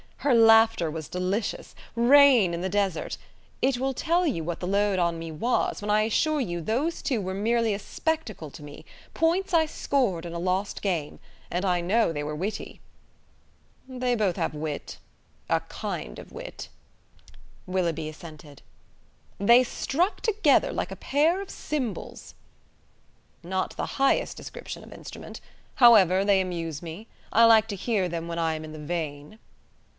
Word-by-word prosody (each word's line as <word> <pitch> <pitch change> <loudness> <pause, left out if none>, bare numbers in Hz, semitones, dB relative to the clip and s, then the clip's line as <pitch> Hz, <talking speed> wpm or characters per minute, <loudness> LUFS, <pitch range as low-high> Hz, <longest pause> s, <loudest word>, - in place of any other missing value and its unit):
Her 285 - +3
laughter 225 -5 +5
was 160 -1 -6
delicious; 185 +4 -3 0.2
rain 245 -5 +6
in 170 - -4
the 190 - -2
desert! 195 -3 -1 0.4
It 265 -1 +2
will 265 +2 -1
tell 340 +7 +1
you 245 - -1
what 170 +1 -4
the 180 - -4
load 200 0 +1
on 170 -1 +1
me 165 0 -6
was, 230 +11 0
when 205 - -5
I 210 +1 +4
assure 300 +8 +1
you 175 -10 -2
those 265 - -1
two 255 -6 -1
were 190 0 -4
merely 225 +2 +1
a 200 - -3
spectacle 225 - -3
to - - -12
me 145 0 -11 0.3
points 345 +4 +1
I 325 -1 +5
scored 245 - -1
in 170 - -7
a 170 - -4
lost 185 +3 -2
game. 170 -7 -2 0.3
And 180 +3 -2
I 180 -2 +1
know 205 +3 +2
they 145 -1 -3
were 150 +1 -4
witty." 195 +7 -5 1.1
"They 255 -1 -1
both 205 -6 0
have - - -1
wit; 150 -1 -5 0.5
a - - +3
kind - - -6
of - - -11
wit," - - -8 1.0
Willoughby 170 -4 -1
assented. 155 -2 -12 0.8
"They 235 +5 +6
struck 340 - -1
together 435 -1 +3
like - - -3
a - - -5
pair 320 +7 +1
of 395 - -8
cymbals." 260 -8 -5 1.1
"Not 185 +2 -2
the - - -2
highest 275 0 +2
description - - -8
of - - -12
instrument. - - -10 0.3
However, 195 -7 +6
they 200 -2 +4
amuse 165 -5 -4
me. 170 +7 -8 0.2
I 230 +1 +6
like 225 -1 +6
to 205 - -3
hear 200 -1 0
them 170 0 -4
when 170 0 -4
I 165 -1 +1
am 155 - -6
in 155 - -8
the 155 - -8
vein." 150 +3 -5
200 Hz, 165 wpm, -26 LUFS, 170-245 Hz, 1.1 s, rain